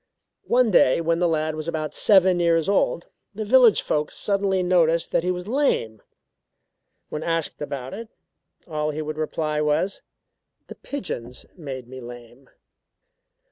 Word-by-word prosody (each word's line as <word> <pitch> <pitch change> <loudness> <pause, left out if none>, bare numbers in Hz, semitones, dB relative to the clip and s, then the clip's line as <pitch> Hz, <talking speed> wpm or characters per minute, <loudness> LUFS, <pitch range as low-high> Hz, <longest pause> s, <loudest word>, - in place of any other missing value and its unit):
One 245 -2 +3
day 130 -7 +4
when 165 0 0
the 175 - +2
lad 155 -1 0
was 155 +1 -6
about 155 -2 -3
seven 190 -3 +4
years 165 -2 +2
old, 195 -3 +1 0.3
the 215 +1 -4
village 240 0 +5
folks 150 0 -2
suddenly 195 -2 0
noticed 170 -2 +2
that - - +2
he 180 - -2
was 180 +1 -3
lame. 220 - 0 1.1
When 150 - -5
asked 165 -2 -2
about 135 -3 -5
it, 225 +1 -8 0.6
all 155 -2 -2
he 155 +1 -4
would 155 0 -5
reply 155 -1 -2
was: 150 +6 0 0.6
"The - - -10
pigeons 125 - -7
made 135 -7 -7
me 130 +1 -10
lame." 120 +2 -12
165 Hz, 145 wpm, -23 LUFS, 150-185 Hz, 1.1 s, village